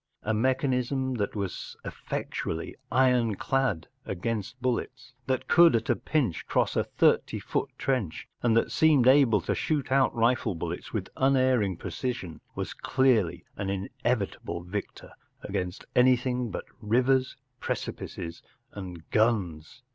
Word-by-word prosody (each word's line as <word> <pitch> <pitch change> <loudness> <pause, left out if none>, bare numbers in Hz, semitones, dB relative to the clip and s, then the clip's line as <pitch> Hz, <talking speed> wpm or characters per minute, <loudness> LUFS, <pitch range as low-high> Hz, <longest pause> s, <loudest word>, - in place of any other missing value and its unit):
A 110 - 0
mechanism 130 +2 +1
that 100 0 -2
was 100 -3 -4
effectually 80 - -4 0.2
ironclad 125 -4 +2 0.2
against 110 +5 -3
bullets, 130 +1 -3
that 130 -1 -1
could 170 -6 +6
at 115 - +1
a - - +3
pinch 140 - -1
cross - - +1
a - - +2
thirty - - +2
foot - - -2
trench, 120 -12 -2
and 115 -2 +3
that - - +2
seemed 150 -6 +4
able 130 -7 +6
to - - -1
shoot 145 -5 -1
out 135 0 +4
rifle 115 -4 +2
bullets 80 - -5
with - - -3
unerring 130 -8 +3
precision, 120 -7 -4
was - - -4
clearly 125 -9 +1
an 100 - -2
inevitable 100 -2 -2
victor 100 +4 -6 0.3
against 90 0 -4
anything 125 -1 +3
but - - -5 0.2
rivers, 130 +4 +2 0.2
precipices, 85 -1 -5 0.3
and 90 -5 -8
guns. 105 -3 0
120 Hz, 125 wpm, -28 LUFS, 100-130 Hz, 0.3 s, could